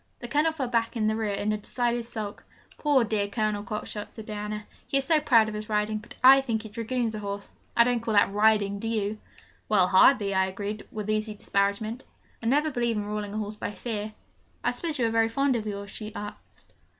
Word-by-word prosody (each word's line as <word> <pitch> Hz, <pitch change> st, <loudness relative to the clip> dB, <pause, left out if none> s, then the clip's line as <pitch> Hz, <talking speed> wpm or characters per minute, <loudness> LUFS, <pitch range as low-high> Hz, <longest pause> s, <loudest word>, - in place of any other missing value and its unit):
The 240 Hz, -, -7 dB
Colonel 300 Hz, +6 st, +2 dB
fell 285 Hz, -5 st, -3 dB
back 230 Hz, 0 st, 0 dB
in 215 Hz, -, +1 dB
the 215 Hz, 0 st, +2 dB
rear 220 Hz, -2 st, -1 dB
in 205 Hz, +1 st, -1 dB
a 210 Hz, -, -2 dB
decided 240 Hz, +2 st, -1 dB
sulk. 215 Hz, -3 st, -6 dB, 0.3 s
'Poor 285 Hz, -4 st, +3 dB
dear 210 Hz, -2 st, 0 dB
Colonel 210 Hz, 0 st, -1 dB
Cockshott!' 210 Hz, -1 st, -5 dB
said 220 Hz, -, -10 dB
Diana, 210 Hz, 0 st, -5 dB, 0.2 s
'he 275 Hz, -, +1 dB
is 270 Hz, -, 0 dB
so 320 Hz, -2 st, +4 dB
proud 230 Hz, -7 st, +5 dB
of 215 Hz, -, -4 dB
his 215 Hz, +1 st, -5 dB
riding, 215 Hz, 0 st, 0 dB
but 210 Hz, -, -12 dB
I 270 Hz, +1 st, +9 dB
think 230 Hz, -4 st, -2 dB
he 220 Hz, -, -8 dB
dragoons 230 Hz, +1 st, -2 dB
a 215 Hz, -, -4 dB
horse. 200 Hz, -1 st, -5 dB, 0.3 s
I 235 Hz, -, +8 dB
don't 245 Hz, 0 st, +1 dB
call 225 Hz, -1 st, -2 dB
that 200 Hz, -1 st, +4 dB
riding, 210 Hz, -1 st, +3 dB
do 225 Hz, -, -4 dB
you?' 215 Hz, -1 st, -1 dB, 0.5 s
'Well 190 Hz, -4 st, +4 dB
hardly,' 200 Hz, +1 st, +5 dB
I 190 Hz, 0 st, +3 dB
agreed, 205 Hz, +2 st, -5 dB
with 210 Hz, -1 st, -5 dB
easy 215 Hz, 0 st, -1 dB
disparagement. 205 Hz, +4 st, -1 dB, 0.4 s
'I 225 Hz, -, -3 dB
never 295 Hz, +5 st, +3 dB
believe 240 Hz, -3 st, 0 dB
in 205 Hz, -, -2 dB
ruling 210 Hz, 0 st, -4 dB
a -, -, -2 dB
horse 210 Hz, 0 st, -4 dB
by -, -, -3 dB
fear.' 215 Hz, 0 st, -4 dB, 0.5 s
'I -, -, +2 dB
suppose 325 Hz, -3 st, -3 dB
you 245 Hz, -, +2 dB
are 225 Hz, -, +1 dB
very 225 Hz, 0 st, +3 dB
fond 275 Hz, +3 st, +1 dB
of 220 Hz, -2 st, -2 dB
yours?' 200 Hz, -1 st, -5 dB
she 215 Hz, -1 st, -7 dB
said. 205 Hz, 0 st, -5 dB
215 Hz, 225 wpm, -27 LUFS, 210-235 Hz, 0.5 s, I